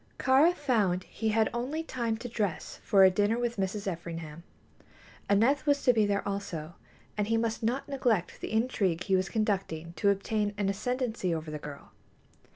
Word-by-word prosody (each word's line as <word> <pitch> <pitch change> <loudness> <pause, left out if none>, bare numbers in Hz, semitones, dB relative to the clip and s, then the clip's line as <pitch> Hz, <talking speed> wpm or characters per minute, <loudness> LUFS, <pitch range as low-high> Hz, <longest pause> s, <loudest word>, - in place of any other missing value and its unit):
Kāra 270 +6 +5
found 210 - +1
he 220 - -3
had 220 0 +3
only 265 +7 -2
time 235 -7 -2
to 245 - -6
dress 210 -7 -3
for 195 -3 +5
a 190 - +7
dinner 205 +4 +1
with 240 -1 -2
Mrs. 195 +1 -2
Everingham. 165 -3 -5 0.9
Aneth 240 +9 +3
was 285 -1 +2
to 250 - +5
be 215 -3 +3
there 200 0 -1
also, 175 -5 -4 0.4
and 210 -1 -1
he 225 +1 +2
must 225 0 -1
not 240 +6 -1
neglect 245 -10 0
the - - -5
intrigue 205 -7 0
he 190 - +2
was 185 -1 0
conducting 185 -6 -2
to 200 - +3
obtain 205 +1 0
an 200 -1 0
ascendency 220 -3 -1
over 155 -1 -5
the 150 - -5
girl. 145 -1 -10
210 Hz, 175 wpm, -29 LUFS, 185-235 Hz, 0.9 s, a